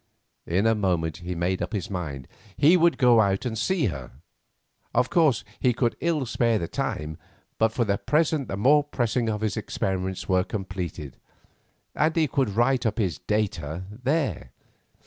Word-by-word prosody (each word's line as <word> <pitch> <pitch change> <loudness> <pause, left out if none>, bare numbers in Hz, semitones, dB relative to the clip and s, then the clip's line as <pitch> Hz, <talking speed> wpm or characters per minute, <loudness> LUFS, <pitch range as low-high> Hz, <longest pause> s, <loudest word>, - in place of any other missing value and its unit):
In 95 +5 +1
a 115 - +4
moment 90 -7 0
he 90 +1 -5
made 90 +2 -1
up - - -3
his 100 -5 -2
mind; 75 -9 -5 0.3
he 155 +5 +6
would 170 -1 +3
go 120 -4 +5
out 100 +2 +1
and 115 -3 -2
see 165 - +1
her. 65 - -4 0.9
Of 125 - +2
course, 155 -8 +3 0.2
he 125 - +3
could 120 0 0
ill 160 -5 0
spare 115 -1 +1
the 85 - -3
time, 75 0 -3 0.4
but 110 0 +3
for 120 +1 0
the 100 -1 0
present 150 -2 +1
the 95 - -4
more 145 +8 +5
pressing 120 -4 -1
of 105 -1 -2
his 110 -2 -1
experiments 95 -1 -3
were 95 -1 +3
completed, 95 -8 -5 0.8
and 155 +1 +1
he 160 -2 +3
could 135 -3 0
write 120 +2 +2
up 105 - -2
his 95 -7 -1
"data" 90 -6 -2
there. 125 - -2
110 Hz, 170 wpm, -25 LUFS, 90-130 Hz, 0.9 s, he